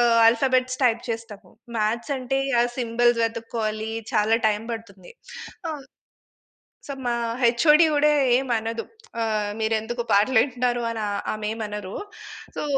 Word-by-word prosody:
ఆహ్, 235 -1 +4
alphabets 255 +2 +2
type 235 -1 +3
చేస్తాము. 225 -3 -7 0.3
Maths 230 +6 -1
అంటే. 260 +1 -1 0.2
ఆ - - +5 0.2
సింబల్స్ 240 0 +2
వెతుక్కోవాలి. 225 -1 -3 0.2
చాలా 215 +2 +3
టైమ్ 210 +1 -2
పడుతుంది. 225 - -9 0.6
అమ్ 295 -3 -7 1.0
సో, 280 - -4
మా 240 - +1 0.3
హెచ్ఓడి‌ 300 +7 +5
గూడా 300 +1 +4 0.3
ఏమనదు. 230 -3 -2 0.4
ఆహ్, 215 -2 -1
మీరెందుకు 220 +2 -1
పాటలు 215 +5 +4
వింటున్నారు 245 -2 -1
అని 225 -1 -4
ఆహ్, 200 0 -2
ఆమేమనరు. 210 -2 -5 0.6
సో - - -2
230 Hz, 120 wpm, -24 LUFS, 215-245 Hz, 1.0 s, ఆ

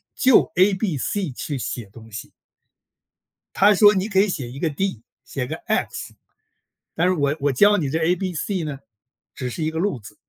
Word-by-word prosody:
就 260 -2 +4
A、 190 +3 +4
B、 190 -5 -1
C 185 +3 -2
去 140 +3 -5
写 120 -2 -4
东 115 +1 -14
西。 105 - -8 1.2
他 205 +2 +6
说： 205 +1 +6
“你 190 +3 -1
可 190 -3 +2
以 200 - +4
写 135 -11 -4
一 135 - -9
个 165 - 0
D、 145 - -3 0.2
写 125 +1 -4
个 - - -4
X， - - -2 0.8
但 175 +3 +1
是 185 - +2
我 145 -3 +1
我 145 +1 +1
教 205 +10 +5
你 150 -5 -1
这 155 +4 -1
A、 165 +2 +2
B、 185 0 -4
C 185 +2 -2
呢， 150 -3 -5 0.6
只 130 -2 -4
是 155 +6 -4
一 155 - 0
个 160 - -5
路 190 -4 0
子。” 105 - -14
160 Hz, 215 characters per minute, -22 LUFS, 135-195 Hz, 1.2 s, 他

